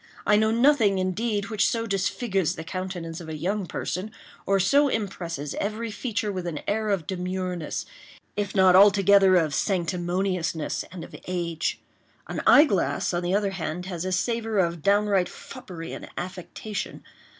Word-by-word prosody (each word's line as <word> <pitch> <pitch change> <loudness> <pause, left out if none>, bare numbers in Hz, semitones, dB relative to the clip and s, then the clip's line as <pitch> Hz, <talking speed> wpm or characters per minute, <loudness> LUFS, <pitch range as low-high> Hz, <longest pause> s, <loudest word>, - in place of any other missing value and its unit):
I 210 - +5
know 220 +1 +3
nothing, 230 -4 +4
indeed, 205 +3 -1
which 215 - +3
so 230 -1 -1
disfigures 195 -3 0
the 160 - -6
countenance 180 -2 -5
of 160 - -9
a 155 - -4
young 190 +4 -2
person, 185 +5 -3 0.4
or 195 0 +3
so 280 +10 +4
impresses 170 - -3
every 220 +2 -3
feature 215 -2 -2
with 185 -2 -4
an 155 -4 -4
air 215 +1 0
of 195 -6 0
demureness, 180 -2 -3 0.5
if 205 -1 -2
not 190 -2 +6
altogether 195 -1 +6
of 160 -5 +2
sanctimoniousness 175 -1 -1
and 175 -2 -7
of - - -11
age. 170 -3 -2 0.5
An - - -3
eyeglass, 225 - +4
on 175 - 0
the 180 +2 0
other 200 -1 +1
hand, 180 -1 -4
has 180 -3 -4
a 185 - -2
savor 225 +3 -1
of 170 -3 +1
downright 200 0 +2
foppery 180 -11 -9
and - - -8
affectation. 185 +3 -6
190 Hz, 155 wpm, -26 LUFS, 175-210 Hz, 0.5 s, not